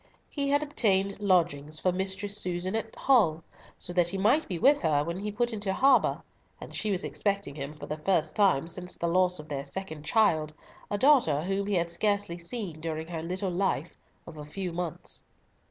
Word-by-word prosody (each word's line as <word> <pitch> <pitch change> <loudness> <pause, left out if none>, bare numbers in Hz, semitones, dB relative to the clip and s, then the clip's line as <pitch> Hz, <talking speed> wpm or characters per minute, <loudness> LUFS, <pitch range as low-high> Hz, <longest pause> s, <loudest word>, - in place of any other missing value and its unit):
He 280 -2 -1
had 285 +1 +3
obtained 200 -9 +1
lodgings 165 -6 +1
for 185 - +2
Mistress 190 +2 -3
Susan 180 -1 -2
at 225 0 -4
Hull, 170 - +3 0.3
so 175 - -5
that 175 -1 +3
he 195 - -2
might 230 +11 +3
be 180 - -3
with 280 - +4
her 150 -4 +2
when 170 +3 -4
he 210 +1 -3
put 240 +2 -1
into 205 -2 -2
harbour, 265 +7 +3 0.4
and - - -10
she 215 - 0
was 190 -3 0
expecting 155 +3 -1
him 140 +1 -6
for 145 -1 -8
the 150 +1 -5
first 160 -2 +1
time 195 -9 +3
since 180 +2 -6
the - - -3
loss 180 +1 +2
of 150 - -7
their 140 -2 -3
second 160 +1 -6
child, 155 -5 +2 0.3
a 205 - -1
daughter 220 - +4
whom 195 +2 -1
he 205 - 0
had 170 -1 0
scarcely 200 -2 0
seen 175 -3 -5
during 160 0 -4
her 165 -2 -4
little 185 +3 -2
life 175 -4 -1 0.3
of 165 -2 -11
a 150 - -7
few 180 +2 -4
months. 175 -2 -4
180 Hz, 200 wpm, -28 LUFS, 160-205 Hz, 0.4 s, with